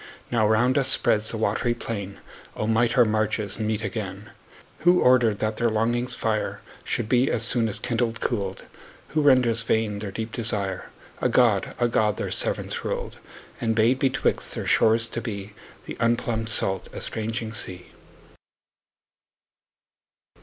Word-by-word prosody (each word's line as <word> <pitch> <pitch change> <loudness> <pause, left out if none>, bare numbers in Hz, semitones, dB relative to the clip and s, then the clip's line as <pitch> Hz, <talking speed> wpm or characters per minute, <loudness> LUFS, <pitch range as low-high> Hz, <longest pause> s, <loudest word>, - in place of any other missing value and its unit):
Now 110 -3 +2
round 125 +5 +3
us 135 -1 +3
spreads 110 -4 +3
the 115 - -2
watery 110 +3 0
plain— 100 -4 -6 0.4
O - - -2
might 115 +3 +1
our 120 - +7
marges 110 -1 -1
meet 110 0 -1
again! 100 -1 -5 0.5
Who 175 +2 +4
order'd 120 -4 +4
that 110 0 -1
their 120 0 +1
longing's 120 +3 0
fire 110 -1 -2 0.2
Should 120 -3 -2
be, 125 +3 +2
as - - +1
soon 115 -3 +4
as 105 - -2
kindled, 115 -1 -2
cool'd? 100 -5 -2
20 - - -21 0.4
Who 155 - 0
renders 125 -5 +4
vain 110 -2 0
their 105 -1 -5
deep 110 +3 -5
desire?— 100 -5 -1 0.3
A 125 - +2
God, 115 -5 +2
a 120 - +3
God 110 -3 +1
their - - -4
severance - - 0
ruled; - - -4 0.4
And 115 -1 0
bade 115 +4 +3
betwixt 135 -1 0
their - - -4
shores 115 +1 +3
to 115 - -4
be 105 -3 -6 0.3
The - - -6
unplumb'd, 115 -1 0
salt, 95 -3 0
estranging 110 0 -3
sea. 90 -4 -4
115 Hz, 155 wpm, -24 LUFS, 105-120 Hz, 0.5 s, our